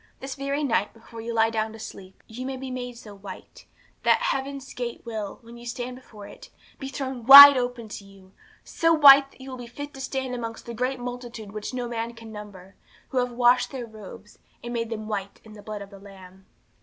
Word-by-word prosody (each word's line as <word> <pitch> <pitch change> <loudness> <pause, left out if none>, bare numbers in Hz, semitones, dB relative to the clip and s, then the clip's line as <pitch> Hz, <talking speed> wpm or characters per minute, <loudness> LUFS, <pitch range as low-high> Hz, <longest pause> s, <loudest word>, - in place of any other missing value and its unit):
This 270 0 -6
very 280 +2 -3
night, 230 -7 0
before 225 0 -11
you 235 +1 -5
lie 225 0 +2
down 220 -1 -2
to - - -10
sleep, 190 -3 -11
you 235 +3 -8
may 265 0 -4
be 260 0 -7
made 245 -1 -6
so 215 -3 -12
white, 195 -1 -12 0.3
that - - +3
heaven's 275 - -3
gate 240 -1 -6
will, 215 -4 -5
when 235 +1 -13
you 240 - -12
stand 245 +1 -5
before 220 -5 -13
it, - - -13 0.3
be 270 - -6
thrown 265 -3 -5
wide 280 +3 +12
open 245 -2 -3
to 210 - -8
you; 195 -1 -18 0.3
so 330 0 +1
white, 280 -2 +8
that 270 - -20
you 265 0 -9
will 255 - -7
be 245 - -8
fit 290 +4 -8
to 270 - -9
stand 265 -1 -4
amongst 230 -2 -6
that 235 - -7
great 255 +3 -2
multitude 245 -4 -7
which 215 0 -6
no 250 -1 -4
man 235 0 -4
can 225 -1 -12
number, 200 -3 -11 0.4
who 260 - 0
have 250 0 -1
washed 245 0 +3
their 255 -3 -6
robes, 210 -2 -13 0.2
and 240 0 -6
made 230 -1 -2
them 215 -2 -5
white 200 -2 -5
in 220 - -14
the 210 - -12
blood 210 -1 -7
of 200 - -15
the 200 - -12
Lamb. 190 -1 -15
235 Hz, 225 wpm, -25 LUFS, 215-255 Hz, 0.4 s, wide